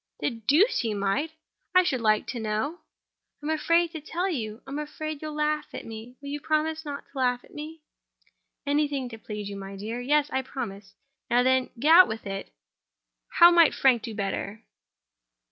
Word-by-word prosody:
"The - - 0
deuce 285 - +3
he 220 -3 -1
might! 200 +11 0 0.5
How, 365 - +9
I - - -1
should 260 -8 0
like 215 -1 +3
to 240 - -4
know?" 220 +10 -2 0.6
"I'm 305 - -1
afraid 335 +2 +2
to 320 -3 -7
tell 345 +5 -2
you. 225 - -4
I'm 275 +2 -5
afraid 300 0 -5
you'll 305 -1 -5
laugh 300 0 0
at - - -7
me. 225 +3 -9
Will 280 - -8
you 290 +1 -3
promise 315 +1 0
not 285 -2 -6
to 275 - -15
laugh 250 -1 +1
at - - -19
me?" 310 +1 -8 0.8
"Anything 285 -3 0
to 225 -2 -10
please 210 -2 -6
you, 200 0 -6
my 195 0 -7
dear. 220 +5 -5
Yes: 295 +3 +2
I 265 - 0
promise. 205 -7 -7 0.3
Now, 245 +1 +4
then, 260 0 +2 0.2
out 340 +3 +9
with 220 -1 -6
it! 195 0 -5 0.8
How 345 0 +8
might 335 -2 +5
Frank 255 -4 +4
do 225 -2 -6
better?" 200 +1 -3
265 Hz, 185 wpm, -27 LUFS, 220-305 Hz, 0.8 s, How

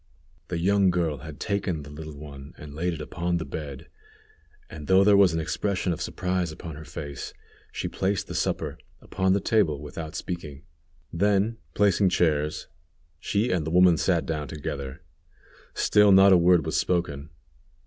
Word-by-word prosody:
The 90 - -3
young 100 +2 +3
girl 85 -4 0
had 80 -1 -10
taken 95 -6 -2
the 70 - -11
little 75 0 -9
one 70 -2 -10
and 75 -1 -10
laid 85 +3 -1
it 80 - -6
upon 85 +3 -2
the 80 - -4
bed, 70 -4 -7 0.8
and, 75 -2 -9
though 95 +1 +5
there 100 0 +6
was 100 -3 +6
an - - 0
expression 95 +3 -1
of 80 - -7
surprise 90 -2 -2
upon 80 0 -8
her 80 +1 -10
face, 70 0 -7 0.4
she - - -3
placed 95 +1 -1
the - - -8
supper - - -2 0.2
upon 95 0 0
the 100 - +2
table 100 -10 +1
without 75 +2 -7
speaking. 80 -5 -6 0.5
Then, 100 +5 +1 0.2
placing 100 -1 +3
chairs, 75 -4 0 0.5
she 105 +6 0
and 90 -4 0
the 75 - -3
woman 90 +1 +5
sat 85 +1 +1
down 75 -3 -3
together. 70 0 -6 0.7
Still 105 -1 +4
not 95 0 +7
a - - +8
word 85 -2 +4
was - - -2
spoken. 80 -5 -1
85 Hz, 170 wpm, -26 LUFS, 75-95 Hz, 0.8 s, a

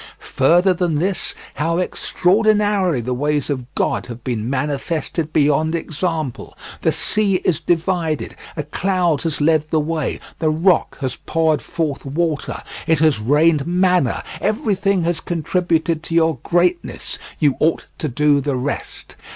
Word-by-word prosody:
Further 175 +8 +4
than 175 -3 0
this, 185 +5 -1 0.2
how 165 +2 -1
extraordinarily 200 - +2
the 125 +2 -2
ways 145 +2 0
of 130 -3 -4
God - - 0
have 120 -1 -9
been 120 -2 -2
manifested 150 +3 -2
beyond 155 +2 +2
example: 160 -4 -3 0.2
the - - +2
sea 210 -2 +1
is 170 -4 +2
divided, 170 -1 -1 0.2
a 150 - -1
cloud 175 0 0
has 165 -3 -2
led 155 0 +2
the 160 - +2
way, 155 -1 -2 0.2
the 160 - +2
rock 165 +3 +2
has 130 -2 -2
poured 160 -2 +2
forth 155 -5 -3
water, 155 +2 -2 0.2
it 160 - +4
has 155 -5 +3
rained 150 +5 +3
manna, 180 -7 +2 0.2
everything 200 - +1
has 170 0 0
contributed 165 -1 0
to 165 - -4
your 160 -5 +3
greatness; 175 0 0 0.2
you 145 -4 +2
ought 160 +1 +1
to 155 - -1
do 145 +2 +2
the 140 0 -1
rest. 130 +3 -5
160 Hz, 145 wpm, -20 LUFS, 145-175 Hz, 0.2 s, Further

